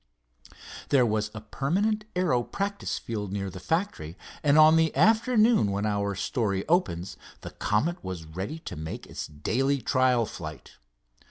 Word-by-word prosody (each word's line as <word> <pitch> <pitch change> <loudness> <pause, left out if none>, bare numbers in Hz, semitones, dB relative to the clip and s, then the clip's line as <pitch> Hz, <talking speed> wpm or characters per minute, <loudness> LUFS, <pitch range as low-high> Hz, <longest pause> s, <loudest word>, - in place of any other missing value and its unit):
There 130 -3 +4
was 110 -1 0
a 110 - -6
permanent 195 - -1
aero 170 -9 +2
practice 200 +10 -3
field 105 -4 -5
near 100 -1 -3
the 95 - -8
factory, 90 - -2 0.2
and 145 0 +4
on 155 +1 +8
the 160 -1 +2
afternoon 220 - +4
when 100 +1 -1
our 100 -1 -1
story 100 -1 -1
opens 120 - 0 0.2
the - - -8
Comet 160 - -1
was 90 -4 -6
ready 95 - -5
to - - -7
make 80 +1 -6
its - - -6
daily 130 - 0
trial 130 -3 +2
flight. 80 -7 -9
120 Hz, 150 wpm, -27 LUFS, 100-165 Hz, 0.2 s, on